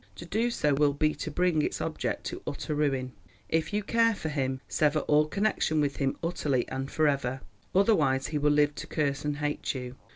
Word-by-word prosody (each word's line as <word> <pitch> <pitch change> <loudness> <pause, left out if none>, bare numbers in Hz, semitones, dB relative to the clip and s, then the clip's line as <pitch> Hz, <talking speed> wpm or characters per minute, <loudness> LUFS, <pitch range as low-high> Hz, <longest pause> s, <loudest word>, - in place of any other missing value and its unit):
To 170 - -9
do 220 +7 0
so 150 -11 +1
will 145 0 +3
be 155 +1 +1
to - - -5
bring 175 -3 +2
its - - -2
object - - -2
to - - -5
utter - - -3
ruin. 135 -4 0 0.4
If 160 0 0
you 210 0 -1
care 230 +1 +3
for 160 -5 -4
him, 135 -3 -1
sever 150 0 +2
all 150 +1 +3
connection 195 -4 +1
with 145 -2 0
him 135 -1 0
utterly 145 -7 0
and 135 +1 -4
for 155 -1 +2
ever. 135 -2 -1 0.3
Otherwise 155 -10 +3
he 150 - -1
will 150 +1 +3
live 145 0 +3
to - - -7
curse 140 -2 -1
and 150 -1 -2
hate 150 -1 -2
you. 125 -1 -6
150 Hz, 205 wpm, -28 LUFS, 140-160 Hz, 0.4 s, will